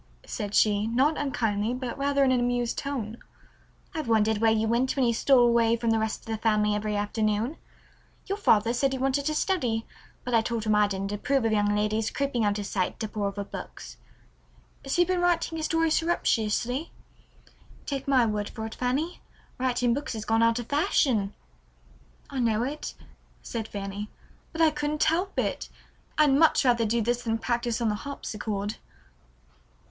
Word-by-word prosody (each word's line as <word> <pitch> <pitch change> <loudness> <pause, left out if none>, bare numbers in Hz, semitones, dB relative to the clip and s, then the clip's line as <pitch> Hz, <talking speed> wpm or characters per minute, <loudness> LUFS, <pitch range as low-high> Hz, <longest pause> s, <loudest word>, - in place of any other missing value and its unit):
said 205 0 -4
she, 210 0 +3
not 265 +7 +2
unkindly, 225 -5 -1
but 250 -2 -4
rather 280 0 +1
in 265 - +3
an 255 - +3
amused 245 -1 0
tone. 240 -6 -4 0.8
"I've 315 -5 -4
wondered 220 -1 +2
where 225 0 +4
you 220 0 +2
went 240 +3 +1
when 270 -3 +2
you 235 - +2
stole 250 +1 +4
away 235 -1 +3
from 230 -1 0
the 225 - +2
rest 220 0 -2
of - - -20
the 225 -2 -3
family 210 -1 +2
every 210 0 -2
afternoon. 215 +5 -1 0.7
Your 400 +1 -3
father 225 - +3
said 270 +2 +1
you - - -5
wanted 270 +2 0
to 305 - 0
study, 245 - 0 0.4
but 250 - -4
I 230 - +5
told 230 -1 -2
him 215 -1 +1
I 210 0 +4
didn't 195 0 -3
approve 260 +5 0
of 225 - +2
young 205 -1 +2
ladies 210 +1 0
creeping 275 -5 -1
out 205 0 +1
of 205 - -4
sight 185 -2 -2
to 220 - -2
pore 205 -1 -2
over 200 0 -4
books. - - -9 0.9
So 310 +6 +2
you've - - -5
been 365 -1 +1
writing 345 -2 +1
a - - -3
story 325 0 +1
surreptitiously? 255 -4 0 0.9
Take 275 -2 -4
my 260 -3 +4
word 210 -2 -2
for 220 - -6
it, 220 - -6
Fanny, 275 +8 -2 0.4
writing 245 -2 +1
books 285 +2 -3
has 215 -1 -5
gone 225 +1 +2
out 230 0 +3
of 240 - -4
fashion." 240 -7 +1 0.9
"I 275 - -5
know 230 -2 +2
it," 285 +4 -5 0.5
said 225 -2 -4
Fanny, 200 0 -5 0.4
"but 325 - -3
I 320 -1 +6
couldn't 300 0 -1
help 360 +5 0
it. - - -1 0.5
I'd 300 -3 +5
much 300 0 +4
rather 235 -3 +3
do 230 +1 +1
this 240 +2 0
than 225 -2 -1
practice 235 0 -1
on 230 -2 +1
the - - +1
harpsichord." 210 -7 -4
235 Hz, 185 wpm, -27 LUFS, 215-275 Hz, 0.9 s, I